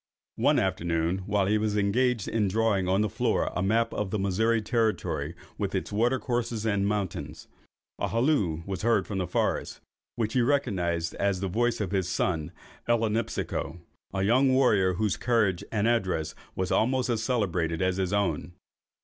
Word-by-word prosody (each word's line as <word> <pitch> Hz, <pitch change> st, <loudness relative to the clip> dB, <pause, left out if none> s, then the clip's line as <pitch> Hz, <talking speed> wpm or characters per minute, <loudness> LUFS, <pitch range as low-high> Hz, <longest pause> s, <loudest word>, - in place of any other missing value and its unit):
One -, -, +3 dB
afternoon, 85 Hz, +2 st, 0 dB
while 100 Hz, -1 st, +2 dB
he 105 Hz, +2 st, +2 dB
was 105 Hz, -1 st, 0 dB
engaged 115 Hz, +2 st, +1 dB
in 110 Hz, -3 st, +1 dB
drawing 100 Hz, -2 st, +1 dB
on 95 Hz, +2 st, +2 dB
the 105 Hz, -, +2 dB
floor -, -, 0 dB
a -, -, 0 dB
map 115 Hz, +4 st, +1 dB
of 105 Hz, -2 st, -2 dB
the 105 Hz, -, -1 dB
Missouri 110 Hz, +4 st, +1 dB
territory, 110 Hz, 0 st, -1 dB, 0.2 s
with -, -, -2 dB
its -, -, -2 dB
water 120 Hz, +5 st, +2 dB
courses 120 Hz, -3 st, -2 dB
and 100 Hz, -2 st, +1 dB
mountains, 85 Hz, -6 st, -3 dB, 0.5 s
a -, -, 0 dB
halloo 115 Hz, -, +1 dB
was 95 Hz, -2 st, -4 dB
heard 115 Hz, 0 st, +2 dB
from 100 Hz, -2 st, -3 dB
the 90 Hz, -, -1 dB
forest, -, -, -1 dB, 0.4 s
which 110 Hz, -2 st, -1 dB
he 125 Hz, -, +3 dB
recognised 90 Hz, -, 0 dB
as 100 Hz, -2 st, 0 dB
the 95 Hz, -, -2 dB
voice 120 Hz, +5 st, 0 dB
of 100 Hz, -4 st, -2 dB
his 95 Hz, -3 st, 0 dB
son 85 Hz, -3 st, -1 dB, 0.4 s
Ellinipsico, 115 Hz, -7 st, -1 dB, 0.3 s
a 95 Hz, 0 st, -1 dB
young 130 Hz, +6 st, +4 dB
warrior, 105 Hz, -9 st, +3 dB
whose 105 Hz, +1 st, 0 dB
courage 110 Hz, -7 st, +1 dB
and 105 Hz, 0 st, +1 dB
address 90 Hz, -10 st, 0 dB, 0.2 s
was 95 Hz, 0 st, -2 dB
almost 130 Hz, +2 st, +2 dB
as 115 Hz, -3 st, 0 dB
celebrated 90 Hz, -9 st, 0 dB
as 95 Hz, 0 st, +1 dB
his 95 Hz, -2 st, -1 dB
own. 90 Hz, -5 st, -1 dB
105 Hz, 170 wpm, -27 LUFS, 95-115 Hz, 0.5 s, young